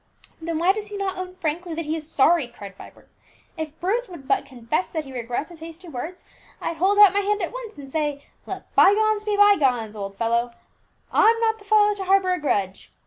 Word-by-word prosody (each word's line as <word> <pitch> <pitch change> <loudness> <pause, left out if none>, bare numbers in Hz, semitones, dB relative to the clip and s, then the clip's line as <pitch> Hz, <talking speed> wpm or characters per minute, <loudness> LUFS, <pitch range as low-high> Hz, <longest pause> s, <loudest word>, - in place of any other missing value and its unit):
"Then 330 0 -3
why 350 +4 +3
does 420 0 -6
he 415 -1 -7
not 385 -2 -3
own 365 0 -6
frankly 335 0 -3
that 330 0 -4
he 310 +2 -1
is 315 -1 -8
sorry?" 305 0 +3
cried 200 -5 -11
Vibert. - - -14 0.5
"If 315 -2 -6
Bruce 430 +6 -1
would 315 -7 -11
but 275 0 +1
confess 255 +5 -2
that 315 -2 -3
he 270 - -10
regrets 245 +6 -4
his 340 - -13
hasty 330 +2 -11
words, 315 +6 -7 0.4
I'd 330 - -4
hold 385 +5 +2
out 415 -2 +8
my 405 - +2
hand 410 +1 0
at 355 +2 -3
once - - -8
and 275 -2 -10
say, 295 -2 -2 0.2
'Let - - -8
by 395 - +6
gones 430 0 +1
be 420 -1 0
by 410 0 +6
gones, 240 -6 0
old 195 -1 -6
boy; 235 +1 +1 0.6
I'm 455 +1 +5
not 445 -1 +1
the 405 - -17
fellow 420 0 +4
to 395 -2 -6
harbour 380 -1 +3
a 360 - -2
grudge.' 200 -10 -2
335 Hz, 225 wpm, -23 LUFS, 275-405 Hz, 0.6 s, out